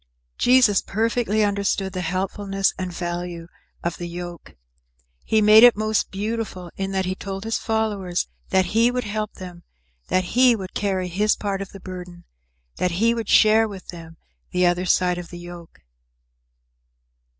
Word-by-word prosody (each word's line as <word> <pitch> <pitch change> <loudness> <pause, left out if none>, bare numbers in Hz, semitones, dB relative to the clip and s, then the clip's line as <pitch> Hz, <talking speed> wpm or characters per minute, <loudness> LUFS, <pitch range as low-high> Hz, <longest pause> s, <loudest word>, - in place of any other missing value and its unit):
Jesus 245 -5 +5
perfectly 220 -1 0
understood 200 -1 0
the 185 - -3
helpfulness 195 +2 -1
and 185 -1 -4
value 175 -1 -5 0.4
of 170 0 -2
the 175 - -5
yoke. 175 -1 -8 0.7
He 220 -1 +2
made 215 +2 +8
it 245 -3 +8
most 215 0 0
beautiful 200 -3 -4
in 195 0 -3
that 190 -1 -1
he 185 - -1
told 195 0 -6
his 225 0 -1
followers 205 -5 -1 0.2
that 190 -1 +3
he 230 +2 +4
would 250 0 -2
help 215 0 -3
them, 180 -2 -10 0.5
that 185 -1 0
he 250 -1 +6
would 190 -4 -7
carry 190 -3 -1
his 205 +5 +1
part 195 -2 -3
of 195 - -6
the 195 - -11
burden, 180 -2 -9 0.5
that 180 -1 0
he 225 +6 +2
would 230 -3 -4
share 220 +1 +5
with 195 -3 -10
them 165 -2 -10 0.3
the 180 0 +1
other 175 +1 +1
side 180 0 +2
of 175 - -9
the 175 - -9
yoke. 175 -1 -11
195 Hz, 160 wpm, -23 LUFS, 180-215 Hz, 0.7 s, made